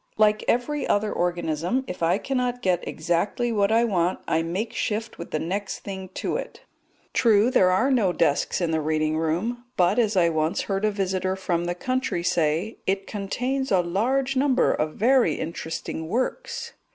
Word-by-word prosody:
Like 215 0 +3
every 285 +5 0
other 210 +1 +1
organism, 175 - -1
if 180 -7 -7
I 165 +1 +3
cannot 250 -2 -2
get 180 -2 +1
exactly 175 +9 -1
what 205 -2 +2
I 230 +1 +4
want 185 -5 +1
I 160 - +2
make 180 +7 -3
shift 220 +1 -3
with 170 - -7
the - - -1
next 195 +6 -3
thing 190 -2 -7
to - - -1
it; - - -7 0.5
true, 225 0 +4
there 185 -7 +5
are 225 +10 +2
no 220 -8 +3
desks 165 0 +1
in 170 -2 0
the 160 -1 +1
reading 155 0 0
room, 185 +10 -1
but, 185 +5 +3
as 215 -4 +2
I 170 -2 +5
once 160 0 0
heard 195 +1 -1
a - - +3
visitor 190 -1 -1
from 175 -3 -1
the 175 0 -2
country 255 -4 -1
say, 165 +5 0
"it 195 +1 0
contains 250 +7 -2
a 185 -2 +4
large 250 +10 0
number 260 -1 +3
of 155 0 -2
very 250 +3 +3
interesting 160 0 -5
works." 255 - -3
195 Hz, 175 wpm, -25 LUFS, 170-235 Hz, 0.5 s, there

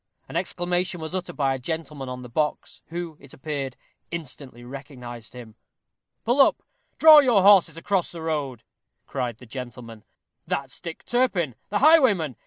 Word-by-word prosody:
An - - -10
exclamation 175 0 -1
was 160 +2 -6
uttered 180 -2 -4
by 135 -2 +2
a 135 - -4
gentleman 150 -2 -5
on 125 0 -6
the - - -8
box, 150 +5 -2
who, 170 -2 -6
it 140 -1 -14
appeared, 135 -2 -4 0.3
instantly 135 -6 -6
recognized 125 -3 -9
him. 120 -3 -10 0.7
"Pull 245 +4 +4
up - - +3 0.3
draw 315 -1 +10
your 240 -9 +4
horses 190 -5 +6
across 185 +1 -1
the 165 -2 -8
road!" 145 -7 -3 0.4
cried 125 -4 -3
the 125 - -14
gentleman; 120 -2 -9 0.4
"that's 135 -1 -3
Dick 165 -2 -8
Turpin, 210 - +1 0.2
the 205 - 0
highwayman. 240 - +5
155 Hz, 155 wpm, -25 LUFS, 130-180 Hz, 0.7 s, draw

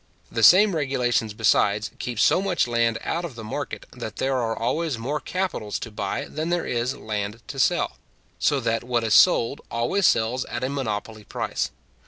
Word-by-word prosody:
The 115 - -1
same 190 - +7
regulations, 125 -7 0
besides, 105 0 +2
keep 120 -3 -4
so 180 - +4
much 190 -8 +1
land 115 -1 +1
out 170 +2 -2
of 160 -8 -6
the 115 - -8
market, 110 - -5
that - - -7
there 135 0 0
are 115 -2 -1
always 135 +4 -1
more 135 +7 -2
capitals 180 - -3
to 115 - -7
buy 100 -2 -3
than 155 +2 -4
there 175 -1 0
is 120 +3 -1
land 105 0 -4
to 140 -1 -6
sell, - - +1 0.4
so 145 - +2
that 115 -1 0
what 120 -1 0
is 110 -2 +1
sold 115 +5 +5
always 120 +12 +1
sells 115 +3 +1
at 120 +3 -5
a 130 - 0
monopoly 110 -5 -4
price. - - -3
120 Hz, 185 wpm, -24 LUFS, 110-145 Hz, 0.4 s, same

